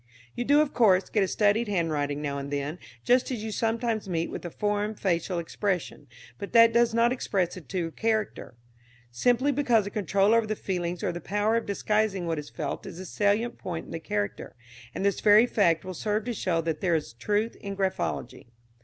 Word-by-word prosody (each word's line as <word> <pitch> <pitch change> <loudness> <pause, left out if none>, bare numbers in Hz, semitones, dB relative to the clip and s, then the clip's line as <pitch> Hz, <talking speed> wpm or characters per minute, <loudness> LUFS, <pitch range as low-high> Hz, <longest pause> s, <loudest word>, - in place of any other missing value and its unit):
"You 245 - -3
do, 290 +3 +5
of 305 - -1
course, 195 -6 +4
get 210 - +1
a 195 - +2
studied 210 +4 +2
handwriting 150 -6 -1
now 140 -1 -2
and 140 0 -6
then, 145 +4 -3 0.2
just 250 +1 +3
as 240 -5 -4
you 220 - -4
sometimes 225 -1 -1
meet 165 -1 -1
with - - -6
a 175 - -4
formed 210 +3 -2
facial 180 -1 0
expression. 170 -3 -3 0.3
But 200 - -7
that 230 0 +7
does 235 0 +4
not 235 +1 +4
express 190 -8 -1
the 185 - -8
true 170 0 -3
character, 220 - -2 0.6
simply 245 - +2
because 245 -6 +2
the 200 - -6
control 200 +1 +2
over 230 -1 +3
the 215 - -1
feelings 180 -3 -3
or - - 0
the 175 0 -6
power 205 +6 0
of 230 - -1
disguising 205 -2 0
what 165 -2 -1
is 150 - -8
felt 145 -3 -5
is 180 -2 -8
a 185 - -7
salient 205 +5 0
point 170 -3 -5
in - - -12
the 165 - -4
character; 105 -9 -4 0.4
and 195 - -2
this 200 - +1
very 215 +2 +6
fact 170 -9 +2
will 185 - -5
serve 210 +4 -2
to 245 - -2
show 175 -6 0
that 160 -2 -3
there 175 -3 +2
is 150 -7 -3
truth 210 - -1
in 200 -1 -7
graphology. 190 -11 -2
200 Hz, 205 wpm, -27 LUFS, 170-220 Hz, 0.6 s, that